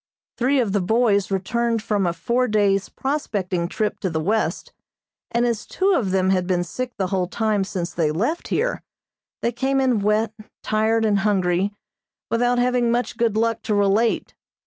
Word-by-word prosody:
Three 265 +3 +2
of 230 -5 +1
the 205 0 +1
boys 200 -1 +2
returned 225 +4 -1
from 205 -4 0
a 170 - 0
four 240 +9 0
days' 205 -3 +2
prospecting 200 - -2
trip 210 +3 -2
to 190 - -1
the 160 -1 -2
west, 210 +7 -1 0.6
and 235 +1 +1
as 230 -3 -2
two 385 +1 +1
of 235 - +1
them 190 0 +2
had 185 -2 +1
been 180 -1 +1
sick 250 +8 -5
the 195 - 0
whole 185 -2 +1
time 215 0 0
since 180 -3 -4
they 165 -3 +1
left 225 - -1
here, - - -1 0.6
they 235 - +2
came 270 +3 0
in 255 -4 +2
wet, 210 +2 +1 0.3
tired 220 +1 +1
and 205 -2 +2
hungry, 195 -1 +1 0.6
without 245 +2 +2
having 245 -1 +2
much 240 +1 0
good 230 -3 +1
luck 230 0 +1
to 210 - -1
relate. 205 +3 +1
215 Hz, 175 wpm, -22 LUFS, 190-235 Hz, 0.6 s, Three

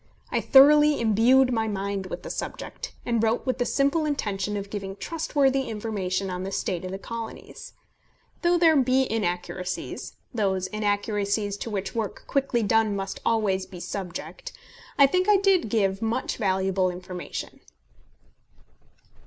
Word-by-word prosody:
I - - +1
thoroughly 295 +2 +6
imbued 240 +4 +4
my 225 -1 0
mind 200 -1 -3
with - - -6
the - - -5
subject, - - -6
and 235 -2 +1
wrote 225 +1 +1
with 255 - -1
the 245 - +1
simple 280 +3 +2
intention 210 -9 -2
of 200 0 -6
giving 195 -2 -5
trustworthy 275 -2 0
information 200 -4 -2
on 180 0 -4
the 190 +1 -4
state 185 -3 -2
of 185 - -4
the 190 - -4
Colonies. 230 +2 -8 0.7
Though 345 0 +3
there 330 -2 +5
be 260 -1 +3
inaccuracies, 180 -3 -3 0.2
those 190 -5 0
inaccuracies 205 0 -1
to 230 - -5
which 200 -2 -3
work 220 -3 -3
quickly 265 -4 0
done 220 0 +2
must 195 0 -4
always 200 -5 +1
be 180 - -10
subject, 190 - -6 0.5
I 280 - +8
think 365 +8 +1
I 415 - +7
did 385 - +2
give 195 -2 +1
much 225 +3 -1
valuable 190 -2 +1
information. 180 0 -7
215 Hz, 145 wpm, -26 LUFS, 195-260 Hz, 0.7 s, I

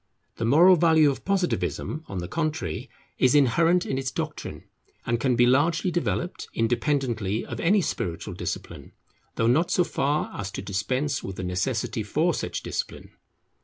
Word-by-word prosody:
The 115 - -1
moral 170 +9 +6
value 160 -3 +5
of 135 - -7
Positivism 180 -4 -1
on 100 - -6
the 85 -1 -4
contrary, 155 - -3 0.3
is 130 +1 +4
inherent 165 +6 +4
in 135 - -2
its 135 -1 -2
doctrine, - - -5 0.4
and 120 0 0
can 130 -1 +2
be 120 - +5
largely 155 +8 +2
developed, 175 +1 -2
independently 115 -3 0
of - - -6
any 195 +4 +3
spiritual 85 - -3
discipline, - - -6 0.4
though 115 - +1
not 145 +9 +3
so 180 - +3
far 145 -2 -1
as 100 -1 -4
to - - -5
dispense 105 +9 -1
with 95 - -6
the 95 - -5
necessity 90 0 -1
for - - +1
such - - -4
discipline. - - -5
135 Hz, 160 wpm, -25 LUFS, 115-165 Hz, 0.4 s, moral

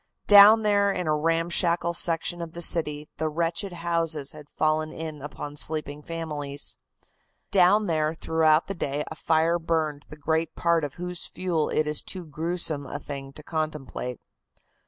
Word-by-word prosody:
Down 210 +2 +8
there 200 -1 +3
in 180 -2 -3
a 155 -1 +2
ramshackle 170 +2 +1
section 170 0 +2
of 165 -1 -7
the 170 - -6
city 150 -3 +2
the 155 0 -1
wretched 170 +5 -2
houses 165 -4 -2
had 150 -2 -13
fallen 155 0 0
in 155 -2 -7
upon 145 0 -7
the 145 - -13
sleeping 150 -1 -2
families. 150 -3 -4 0.8
Down 200 +2 +5
there 155 -2 0
throughout 160 -1 +2
the 195 - -4
day 145 -4 -3
a - - -5
fire 160 +2 +1
burned 160 -3 -2
the 150 - -11
great 160 +2 -1
part 170 -1 +1
of 145 -2 -4
whose 180 0 -2
fuel 175 -4 -1
it 155 - +1
is 150 -1 0
too 185 -2 -7
gruesome 160 0 -1
a - - -5
thing 140 -1 -7
to 150 - -11
contemplate. 150 -6 -4
160 Hz, 165 wpm, -26 LUFS, 150-170 Hz, 0.8 s, Down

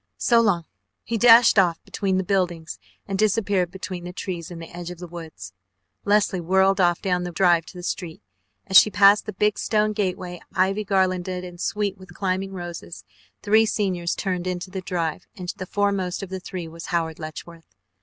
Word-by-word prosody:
So 235 -1 +4
long." 180 -7 +1 0.4
He 230 - -3
dashed 230 -2 +7
off 175 -3 +2
between 190 -2 -1
the 190 - 0
buildings 175 - -1 0.3
and 195 -1 -3
disappeared 200 -4 +1
between 185 -1 -7
the 175 - -6
trees 180 -3 -5
in 175 - -8
the 165 0 -9
edge 175 0 -6
of 180 - -8
the 180 - -8
woods. 160 - -9 0.5
Leslie 205 -3 +2
whirled 190 +2 +3
off 175 -1 +2
down 180 -2 0
the 175 - -4
drive 170 -2 +3
to 180 - -11
the 180 - -8
street. 170 -2 -5 0.4
As 190 - +6
she - - +8
passed 205 +1 +5
the 215 - -4
big 210 +3 +1
stone 215 -1 +1
gateway, 180 -4 -3
ivy 195 +3 +1
garlanded 185 -2 0
and 175 -1 -9
sweet 205 -2 -2
with 185 - -14
climbing 195 0 -2
roses, 175 -1 -7 0.4
three 220 +2 +4
seniors 185 -6 -1
turned 185 -2 -2
into 180 +1 -4
the 190 -1 -4
drive, 170 -4 -3
and 180 -1 -6
the 185 - -6
foremost 200 -2 -1
of 195 - -7
the 190 - -4
three 180 -2 -6
was 165 +1 -9
Howard 165 -2 -2
Letchworth. 160 - -10
185 Hz, 190 wpm, -23 LUFS, 175-195 Hz, 0.5 s, she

